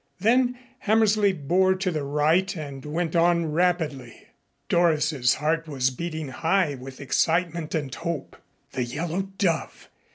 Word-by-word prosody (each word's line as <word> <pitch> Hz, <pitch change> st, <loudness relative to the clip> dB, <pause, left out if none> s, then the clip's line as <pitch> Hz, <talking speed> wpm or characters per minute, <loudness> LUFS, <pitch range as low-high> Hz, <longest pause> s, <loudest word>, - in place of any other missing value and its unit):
Then 245 Hz, +4 st, +3 dB, 0.2 s
Hammersley 215 Hz, -1 st, +3 dB
bore 185 Hz, +3 st, +2 dB
to 185 Hz, 0 st, -1 dB
the 155 Hz, -3 st, -2 dB
right 155 Hz, +8 st, +1 dB
and 140 Hz, -4 st, -7 dB
went 165 Hz, +3 st, -2 dB
on 170 Hz, -1 st, +3 dB
rapidly. 155 Hz, -7 st, -1 dB, 0.4 s
Doris's 155 Hz, -6 st, +2 dB
heart 165 Hz, +2 st, -1 dB
was 130 Hz, -3 st, 0 dB
beating 155 Hz, +1 st, -5 dB
high 165 Hz, +4 st, +1 dB
with 130 Hz, 0 st, -10 dB
excitement 165 Hz, +3 st, 0 dB
and 145 Hz, -5 st, -3 dB
hope. 165 Hz, -2 st, -4 dB, 0.4 s
The 125 Hz, -, -2 dB
Yellow 165 Hz, +9 st, -2 dB, 0.2 s
Dove! 170 Hz, -5 st, -1 dB
165 Hz, 130 wpm, -25 LUFS, 145-180 Hz, 0.4 s, Then